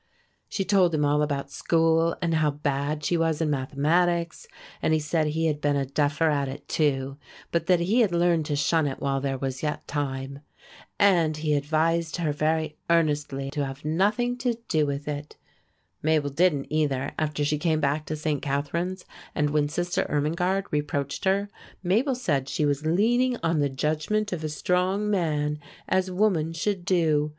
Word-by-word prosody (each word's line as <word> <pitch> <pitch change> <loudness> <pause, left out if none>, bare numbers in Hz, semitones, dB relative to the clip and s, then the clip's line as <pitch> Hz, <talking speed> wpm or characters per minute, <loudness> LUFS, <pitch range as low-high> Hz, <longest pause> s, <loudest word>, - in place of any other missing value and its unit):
She 195 - -2
told 185 -5 +3
him 150 -1 +2
all 145 +1 +2
about 140 -2 -2
school 165 0 +2
and 170 -1 +1
how 155 -1 +3
bad 145 +1 -2
she 175 - +1
was 165 -2 +1
in 160 -2 0
mathematics; 165 +5 0 0.3
and 160 - +2
he - - +1
said 155 +1 0
he 160 +2 -1
had 150 -2 0
been 145 -1 +2
a 140 -1 0
duffer 150 +3 +1
at 140 -2 0
it 135 +1 -8
too, 135 -3 0 0.3
but 170 - 0
that 180 -2 +4
he 205 +8 +2
had 220 -6 +3
learned 170 -2 +2
to 145 - 0
shun 150 +1 +2
it 135 - -4
while 135 -1 -1
there 135 -1 -1
was 130 -1 -4
yet 150 -1 -3
time. 140 -1 -3 0.6
And 170 -6 +3
he 155 -1 0
advised 160 +3 +1
her 165 -4 0
very 155 +1 -1
earnestly 145 -4 +1
to 145 -1 -1
have 135 +1 -6
nothing 210 +10 +1
to 245 -1 0
do 155 -2 +2
with 140 +1 -4
it. 150 0 -5 0.6
Mabel 155 -2 +1
didn't, 150 -2 +1
either, 140 -4 0
after 150 -2 -1
she 150 0 0
came 160 -1 +1
back 150 +1 0
to 155 - -2
St. 150 -2 -2
Catharine's; 170 +7 -2 0.3
and 150 0 +1
when 145 -1 +1
Sister 175 +3 -1
Irmingarde 175 +6 0
reproached 145 0 -2
her, 195 +2 +2 0.4
Mabel 230 +10 +2
said 145 - -1
she 150 - 0
was 145 +1 0
leaning 240 +8 +2
on 165 -1 +1
the 145 -1 +2
judgment 155 +10 -1
of 160 -3 -4
a 155 - -2
strong 185 +6 0
man, 150 -5 0 0.3
as 185 0 +1
woman 180 -4 +1
should 185 +2 -2
do. 160 -5 +2
155 Hz, 180 wpm, -26 LUFS, 145-175 Hz, 0.6 s, that